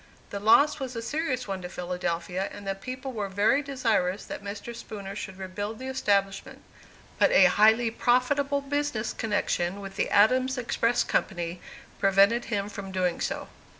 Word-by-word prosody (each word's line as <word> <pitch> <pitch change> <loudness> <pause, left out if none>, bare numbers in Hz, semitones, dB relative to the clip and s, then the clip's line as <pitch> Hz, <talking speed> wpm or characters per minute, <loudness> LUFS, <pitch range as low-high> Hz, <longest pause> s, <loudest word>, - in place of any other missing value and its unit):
The 200 - -4
loss 280 +10 +5
was 260 -2 -5
a 230 - -3
serious 265 -3 -2
one 195 -1 -4
to 180 - -6
Philadelphia, 180 +1 -3
and 200 - -10
the 195 - 0
people 255 +6 -6
were 205 -3 -3
very 205 +9 +2
desirous 225 -9 0
that - - -7
Mr. 205 +4 -6
Spooner 200 -3 -7
should 190 -2 -6
rebuild 205 +3 -5
the 260 - -8
establishment; 200 -6 -1 0.6
but - - +5
a - - +7
highly 220 +2 +4
profitable 275 +4 +1
business 280 -5 -2
connection 200 -4 -1
with 195 -1 -9
the - - 0
Adams 255 +6 +3
Express 240 -1 +1
Company 175 -2 -2 0.4
prevented 200 +4 +4
him 200 -3 -2
from 200 -2 -7
doing 180 -2 -1
so. - - -3
210 Hz, 160 wpm, -27 LUFS, 195-255 Hz, 0.6 s, a